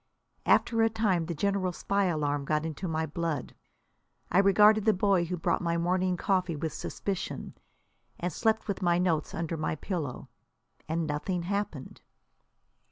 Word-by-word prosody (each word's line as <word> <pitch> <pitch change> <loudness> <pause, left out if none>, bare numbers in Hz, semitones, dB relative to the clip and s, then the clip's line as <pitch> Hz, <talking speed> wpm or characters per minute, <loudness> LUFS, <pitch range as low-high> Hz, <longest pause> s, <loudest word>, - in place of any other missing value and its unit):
After 230 -1 +4
a 225 - +4
time 205 -7 +1
the 170 - -3
general 195 +2 0
spy 200 +3 0
alarm 145 -4 0
got 150 +2 0
into 160 +4 -4
my 160 -1 -1
blood. 160 -2 -3 0.8
I 180 - +5
regarded 210 +2 +5
the 220 - +4
boy 190 -2 +2
who 180 +1 -3
brought 165 - 0
my 170 -1 0
morning 180 +1 +1
coffee 185 -3 0
with 155 +1 -3
suspicion, 195 -2 -4 0.7
and 175 -1 -2
slept 220 +3 +1
with 200 - -3
my 175 -1 +3
notes 170 -4 0
under 165 0 -2
my 155 - -1
pillow. 155 -6 -4 0.6
And 165 +1 0
nothing 165 +4 -2
happened! 195 -7 -4
175 Hz, 155 wpm, -29 LUFS, 160-195 Hz, 0.8 s, I